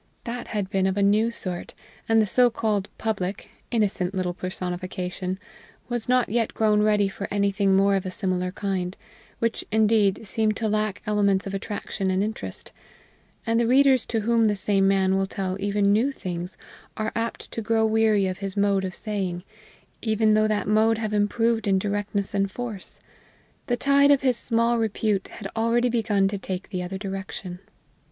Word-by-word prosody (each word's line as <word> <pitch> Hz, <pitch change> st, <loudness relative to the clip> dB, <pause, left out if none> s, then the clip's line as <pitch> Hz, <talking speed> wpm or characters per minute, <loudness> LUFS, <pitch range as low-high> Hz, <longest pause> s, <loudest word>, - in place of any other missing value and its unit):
That 240 Hz, +1 st, -5 dB
had 205 Hz, -3 st, -2 dB
been 190 Hz, -1 st, +2 dB
of 190 Hz, +1 st, -1 dB
a 200 Hz, -, +2 dB
new 210 Hz, +3 st, +3 dB
sort, 185 Hz, -6 st, -5 dB, 0.3 s
and 225 Hz, 0 st, +5 dB
the 215 Hz, -, +4 dB
so 245 Hz, +4 st, +4 dB
called 215 Hz, -3 st, -1 dB
Public, 200 Hz, -3 st, -3 dB, 0.2 s
innocent 200 Hz, -5 st, 0 dB
little 180 Hz, -1 st, -1 dB
personification, 185 Hz, 0 st, -4 dB, 0.5 s
was 240 Hz, -1 st, -3 dB
not 250 Hz, -2 st, +3 dB
yet 230 Hz, +1 st, -1 dB
grown 210 Hz, -1 st, +3 dB
ready 210 Hz, -1 st, +3 dB
for 195 Hz, +1 st, -5 dB
anything 200 Hz, -1 st, +2 dB
more 200 Hz, +1 st, +4 dB
of 190 Hz, -, 0 dB
a 185 Hz, -, -4 dB
similar 185 Hz, -1 st, -1 dB
kind, 190 Hz, -2 st, -3 dB, 0.4 s
which, 230 Hz, -1 st, -1 dB
indeed, 215 Hz, -1 st, +3 dB
seemed 215 Hz, +1 st, 0 dB
to 225 Hz, -, -1 dB
lack 215 Hz, -1 st, -1 dB
elements 200 Hz, -2 st, +2 dB
of 195 Hz, -, -5 dB
attraction 195 Hz, 0 st, -3 dB
and 185 Hz, +1 st, +1 dB
interest; 220 Hz, +2 st, -5 dB, 0.7 s
and 230 Hz, 0 st, +2 dB
the 235 Hz, -, +2 dB
readers 265 Hz, 0 st, +5 dB
to 225 Hz, -2 st, -1 dB
whom 230 Hz, +1 st, +3 dB
the 210 Hz, -1 st, +2 dB
same 195 Hz, 0 st, +3 dB
man 190 Hz, -1 st, +3 dB
will 195 Hz, -, 0 dB
tell 190 Hz, -1 st, -3 dB
even 200 Hz, 0 st, +2 dB
new 240 Hz, +7 st, +2 dB
things 180 Hz, -7 st, -5 dB, 0.4 s
are 215 Hz, 0 st, -1 dB
apt 230 Hz, 0 st, -3 dB
to 230 Hz, -, -4 dB
grow 225 Hz, 0 st, +2 dB
weary 220 Hz, -2 st, +3 dB
of 185 Hz, -1 st, -3 dB
his 195 Hz, -1 st, -4 dB
mode 200 Hz, -1 st, +2 dB
of 185 Hz, -1 st, -4 dB
saying, 190 Hz, -5 st, -3 dB, 0.6 s
even 220 Hz, -1 st, +2 dB
though 215 Hz, 0 st, +4 dB
that 210 Hz, -3 st, -1 dB
mode 220 Hz, +2 st, +3 dB
have 215 Hz, -1 st, -3 dB
improved 225 Hz, +2 st, +1 dB
in 195 Hz, -1 st, +3 dB
directness 205 Hz, 0 st, -2 dB
and 195 Hz, -1 st, +1 dB
force; 220 Hz, -2 st, -3 dB, 0.7 s
the 245 Hz, -, +1 dB
tide 280 Hz, +1 st, +4 dB
of 285 Hz, -2 st, +5 dB
his 255 Hz, -2 st, +2 dB
small 230 Hz, 0 st, +2 dB
repute 215 Hz, -3 st, 0 dB
had 195 Hz, -, -8 dB
already 235 Hz, +2 st, +2 dB
begun 215 Hz, -4 st, +2 dB
to 200 Hz, 0 st, -3 dB
take 190 Hz, 0 st, -5 dB
the 185 Hz, -3 st, -3 dB
other 180 Hz, +2 st, -4 dB
direction. 190 Hz, -2 st, -6 dB
205 Hz, 180 wpm, -25 LUFS, 195-225 Hz, 0.7 s, and